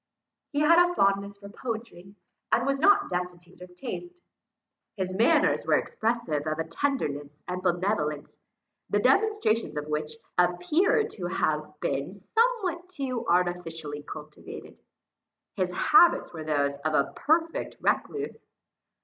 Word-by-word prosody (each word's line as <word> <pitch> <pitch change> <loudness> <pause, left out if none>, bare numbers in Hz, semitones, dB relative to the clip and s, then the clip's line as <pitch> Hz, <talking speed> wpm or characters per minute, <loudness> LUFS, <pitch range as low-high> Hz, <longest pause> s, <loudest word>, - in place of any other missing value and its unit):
He 290 -1 0
had 335 +3 +6
a 355 0 -1
fondness 200 0 +1
for 200 0 -11
poetry, 220 -4 -7 0.4
and - - +3
was 275 0 0
not 400 +7 +5
destitute 180 0 -5
of 180 0 -12
taste. 350 - -7 0.8
His 185 -1 -2
manners 265 - +3
were - - +3
expressive 220 -10 -1
of 155 0 -1
a 160 - -1
tenderness 150 - -3
and 180 0 -3
benevolence, 175 -5 -1 0.5
the - - +2
demonstrations 400 - +2
of 150 - -3
which 150 0 -3 0.3
appeared 305 - +2
to 420 - -5
have - - -1
been - - -2
somewhat 435 -7 0
too 270 -8 -4
artificially 170 -4 -1
cultivated. - - -10 0.8
His 185 -3 0
habits 345 - +4
were 160 -2 -6
those 145 -2 +1
of 155 +1 -1
a 140 - +1
perfect 325 +2 0
recluse. 430 0 -1
195 Hz, 130 wpm, -27 LUFS, -, 0.8 s, had